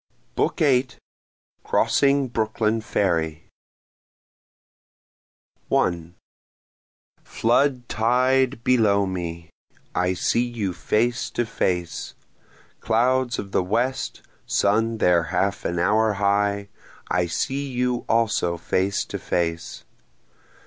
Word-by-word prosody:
BOOK -, -, 0 dB
VIII 135 Hz, -5 st, +3 dB, 0.8 s
Crossing 140 Hz, -1 st, +2 dB
Brooklyn 110 Hz, -1 st, -1 dB
Ferry 80 Hz, -7 st, -1 dB, 2.2 s
1 85 Hz, 0 st, 0 dB, 1.1 s
Flood 125 Hz, +1 st, +1 dB
tide 125 Hz, +2 st, +1 dB
below 105 Hz, -5 st, +3 dB
me! 85 Hz, -3 st, -5 dB, 0.4 s
I 90 Hz, +1 st, 0 dB
see 115 Hz, +6 st, +1 dB
you 115 Hz, -6 st, -3 dB
face 120 Hz, +6 st, 0 dB
to 120 Hz, -, -1 dB
face! 90 Hz, -6 st, -2 dB, 0.6 s
Clouds 125 Hz, +2 st, +1 dB
of 100 Hz, -, -6 dB
the -, -, +2 dB
west 120 Hz, +8 st, -2 dB, 0.2 s
sun 110 Hz, +3 st, +1 dB
there 90 Hz, -5 st, +3 dB
half 95 Hz, +3 st, -1 dB
an 85 Hz, -, -1 dB
hour 105 Hz, +5 st, +2 dB
high 100 Hz, 0 st, 0 dB, 0.4 s
I 90 Hz, -1 st, +1 dB
see 135 Hz, +11 st, -2 dB
you 125 Hz, -1 st, -1 dB
also 110 Hz, -7 st, +1 dB
face 95 Hz, +4 st, -1 dB
to -, -, -6 dB
face. 85 Hz, -1 st, -3 dB
110 Hz, 95 wpm, -23 LUFS, 90-120 Hz, 2.2 s, VIII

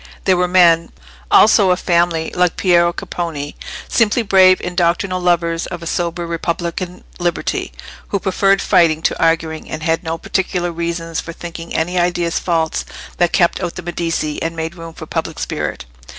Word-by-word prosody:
There 190 Hz, -, +3 dB
were 180 Hz, 0 st, +1 dB
men, 170 Hz, -2 st, +4 dB, 0.4 s
also 210 Hz, -2 st, +6 dB
of 180 Hz, 0 st, +2 dB
family, 170 Hz, -2 st, +1 dB
like 180 Hz, -1 st, +1 dB
Piero 170 Hz, -2 st, +4 dB
Capponi, 160 Hz, -5 st, -5 dB, 0.3 s
simply 230 Hz, +1 st, +2 dB
brave 185 Hz, -2 st, +6 dB
undoctrinal 180 Hz, +1 st, 0 dB
lovers 170 Hz, -1 st, +1 dB
of 175 Hz, -2 st, -7 dB
a -, -, -7 dB
sober 170 Hz, +1 st, -2 dB
republican 170 Hz, +2 st, -3 dB, 0.2 s
liberty, 175 Hz, -1 st, -2 dB, 0.4 s
who 200 Hz, -, -1 dB
preferred 195 Hz, +1 st, +2 dB
fighting 160 Hz, -2 st, +3 dB
to -, -, 0 dB
arguing, 165 Hz, -1 st, 0 dB
and 155 Hz, 0 st, -5 dB
had 165 Hz, +1 st, 0 dB
no 165 Hz, 0 st, -3 dB
particular 180 Hz, 0 st, -1 dB
reasons 165 Hz, 0 st, -3 dB
for 165 Hz, -, -6 dB
thinking 170 Hz, 0 st, -8 dB
any 180 Hz, +3 st, 0 dB
ideas 175 Hz, -1 st, 0 dB
false 165 Hz, -2 st, 0 dB, 0.3 s
that 175 Hz, -, +2 dB
kept 175 Hz, 0 st, +2 dB
out 175 Hz, -2 st, -3 dB
the 180 Hz, -, -7 dB
Medici 165 Hz, -3 st, -2 dB
and 165 Hz, 0 st, -2 dB
made 165 Hz, 0 st, -4 dB
room 165 Hz, -2 st, -10 dB
for -, -, -8 dB
public -, -, -4 dB
spirit. -, -, -4 dB
170 Hz, 165 wpm, -18 LUFS, 165-180 Hz, 0.4 s, also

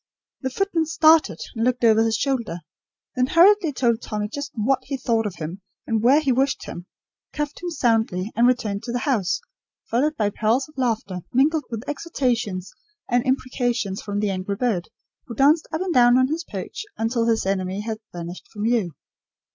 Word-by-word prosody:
The 260 Hz, -, -1 dB
footman 335 Hz, +1 st, 0 dB
started, 315 Hz, 0 st, +4 dB, 0.2 s
and 225 Hz, -, -1 dB
looked 250 Hz, 0 st, +1 dB
over 225 Hz, -1 st, +5 dB
his 225 Hz, -1 st, +1 dB
shoulder; 235 Hz, -11 st, -2 dB, 0.5 s
then 250 Hz, 0 st, +2 dB
hurriedly 355 Hz, +1 st, +5 dB
told 240 Hz, -4 st, +1 dB
Tommy 210 Hz, -1 st, -3 dB
just 285 Hz, +4 st, -5 dB
what 250 Hz, +4 st, +1 dB
he 275 Hz, -, -3 dB
thought 230 Hz, -4 st, 0 dB
of 190 Hz, -, -6 dB
him, 170 Hz, +4 st, -6 dB, 0.2 s
and 225 Hz, -2 st, 0 dB
where 260 Hz, +6 st, +5 dB
he 285 Hz, -4 st, +1 dB
wished 270 Hz, +3 st, +1 dB
him; 175 Hz, +1 st, -8 dB, 0.5 s
cuffed 295 Hz, -1 st, -4 dB
him 355 Hz, -, -3 dB
soundly, 225 Hz, -, 0 dB
and 235 Hz, +1 st, +4 dB
returned 215 Hz, -5 st, 0 dB
to 240 Hz, -, -5 dB
the 245 Hz, -, 0 dB
house, 210 Hz, -, +1 dB, 0.5 s
followed 295 Hz, +6 st, +1 dB
by 205 Hz, -2 st, +1 dB
peals 230 Hz, +7 st, +1 dB
of 305 Hz, -, -20 dB
laughter, 225 Hz, -8 st, -1 dB
mingled 295 Hz, +5 st, +3 dB
with 230 Hz, +2 st, -6 dB
exhortations 245 Hz, -, -2 dB, 0.4 s
and 245 Hz, 0 st, +3 dB
imprecations 245 Hz, -6 st, -1 dB
from 205 Hz, -1 st, -3 dB
the 210 Hz, -2 st, 0 dB
angry 190 Hz, +1 st, -3 dB
bird, 200 Hz, -6 st, -1 dB, 0.4 s
who 235 Hz, -, -7 dB
danced 295 Hz, +6 st, +4 dB
up 315 Hz, +2 st, -2 dB
and 370 Hz, -2 st, -1 dB
down 245 Hz, -1 st, +6 dB
on 255 Hz, 0 st, +3 dB
his 325 Hz, +3 st, -2 dB
perch -, -, -6 dB
until 230 Hz, +1 st, 0 dB
his 225 Hz, -3 st, +1 dB
enemy 190 Hz, 0 st, -1 dB
had 220 Hz, 0 st, -4 dB
vanished 175 Hz, +1 st, -8 dB
from 210 Hz, -1 st, -6 dB
view. 220 Hz, -7 st, +1 dB
240 Hz, 185 wpm, -23 LUFS, 210-275 Hz, 0.5 s, down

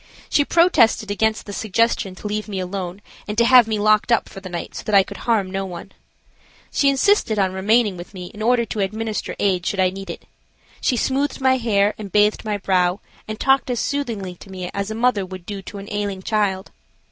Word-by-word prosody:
She 290 Hz, -, +4 dB
protested 260 Hz, -, +3 dB
against 220 Hz, +2 st, 0 dB
the 205 Hz, -, -7 dB
suggestion 220 Hz, -2 st, 0 dB
to 185 Hz, -, -14 dB
leave 210 Hz, +1 st, -2 dB
me 200 Hz, -3 st, -4 dB
alone 185 Hz, +1 st, -5 dB, 0.2 s
and 210 Hz, 0 st, -4 dB
to 235 Hz, -, +5 dB
have 250 Hz, -2 st, +7 dB
me 220 Hz, -1 st, -1 dB
locked 215 Hz, +3 st, +3 dB
up 235 Hz, -, +3 dB
for -, -, -10 dB
the 185 Hz, -, -8 dB
night 175 Hz, -1 st, -5 dB
so -, -, -7 dB
that 210 Hz, -, +1 dB
I 195 Hz, -, +7 dB
could -, -, -10 dB
harm 205 Hz, -5 st, +2 dB
no 195 Hz, 0 st, -2 dB
one. 180 Hz, -3 st, -8 dB, 0.8 s
She 280 Hz, -, +3 dB
insisted 275 Hz, -, +2 dB
on 190 Hz, -2 st, +1 dB
remaining 205 Hz, +1 st, +2 dB
with 175 Hz, +3 st, -10 dB
me 180 Hz, -1 st, -7 dB
in 210 Hz, -, -9 dB
order 235 Hz, +1 st, +3 dB
to 220 Hz, -, -5 dB
administer 215 Hz, +2 st, -2 dB
aid 185 Hz, -3 st, +1 dB
should 195 Hz, +2 st, -2 dB
I 185 Hz, -1 st, +3 dB
need 195 Hz, +1 st, -8 dB
it. -, -, -7 dB, 0.6 s
She 250 Hz, -, +1 dB
smoothed 275 Hz, +5 st, 0 dB
my 260 Hz, -1 st, +3 dB
hair 210 Hz, -4 st, +2 dB
and 200 Hz, -3 st, -7 dB
bathed 210 Hz, +2 st, +3 dB
my 210 Hz, -2 st, -2 dB
brow 185 Hz, -1 st, +1 dB, 0.3 s
and 215 Hz, 0 st, -5 dB
talked 270 Hz, 0 st, +2 dB
as 245 Hz, -2 st, -1 dB
soothingly 230 Hz, -10 st, -2 dB
to 195 Hz, -, -14 dB
me 185 Hz, -1 st, -6 dB
as 200 Hz, +1 st, -3 dB
a 220 Hz, -, -4 dB
mother 230 Hz, -3 st, +2 dB
would 185 Hz, -1 st, -9 dB
do 200 Hz, 0 st, -6 dB
to 200 Hz, -, -9 dB
an 200 Hz, 0 st, -8 dB
ailing 205 Hz, -2 st, -3 dB
child. 200 Hz, -3 st, -1 dB
210 Hz, 220 wpm, -21 LUFS, 190-230 Hz, 0.8 s, have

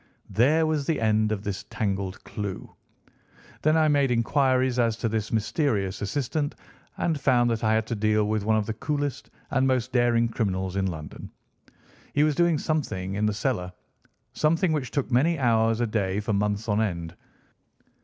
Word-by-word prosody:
There 150 Hz, +8 st, +3 dB
was 155 Hz, -3 st, -1 dB
the 160 Hz, -, +1 dB
end 110 Hz, -1 st, +2 dB
of 105 Hz, -2 st, -2 dB
this 100 Hz, 0 st, -4 dB
tangled 100 Hz, -2 st, -3 dB
clue. 100 Hz, -2 st, -6 dB, 0.9 s
Then 155 Hz, +1 st, +3 dB
I 155 Hz, -1 st, +4 dB
made 140 Hz, -2 st, +3 dB
inquiries 130 Hz, +1 st, +2 dB
as 115 Hz, -2 st, +2 dB
to 115 Hz, -, -1 dB
this 110 Hz, -1 st, -2 dB
mysterious 105 Hz, -, 0 dB
assistant 145 Hz, +7 st, -2 dB, 0.4 s
and 160 Hz, -4 st, -1 dB
found 120 Hz, -3 st, +3 dB
that 115 Hz, 0 st, -2 dB
I 110 Hz, 0 st, +3 dB
had 110 Hz, 0 st, +1 dB
to 115 Hz, -, -3 dB
deal 105 Hz, 0 st, +1 dB
with 110 Hz, -1 st, 0 dB
one 110 Hz, +1 st, +2 dB
of 105 Hz, -, 0 dB
the 110 Hz, -, -3 dB
coolest 145 Hz, +1 st, -3 dB, 0.2 s
and 130 Hz, 0 st, +2 dB
most 130 Hz, -1 st, 0 dB
daring 120 Hz, -1 st, +3 dB
criminals 95 Hz, -5 st, -2 dB
in 95 Hz, -1 st, 0 dB
London. 80 Hz, -4 st, -7 dB, 0.9 s
He 145 Hz, -, +4 dB
was 155 Hz, 0 st, +3 dB
doing 170 Hz, +1 st, +2 dB
something 125 Hz, -, -2 dB
in 105 Hz, +2 st, 0 dB
the 105 Hz, -, 0 dB
cellar—something 120 Hz, -, -2 dB
which 140 Hz, -6 st, -2 dB
took 135 Hz, 0 st, -2 dB
many 155 Hz, +8 st, +3 dB
hours 115 Hz, -3 st, +2 dB
a -, -, +2 dB
day 100 Hz, -3 st, -1 dB
for 105 Hz, +1 st, -2 dB
months 105 Hz, +2 st, -1 dB
on 105 Hz, 0 st, +1 dB
end. 85 Hz, -5 st, -3 dB
115 Hz, 175 wpm, -26 LUFS, 105-140 Hz, 0.9 s, I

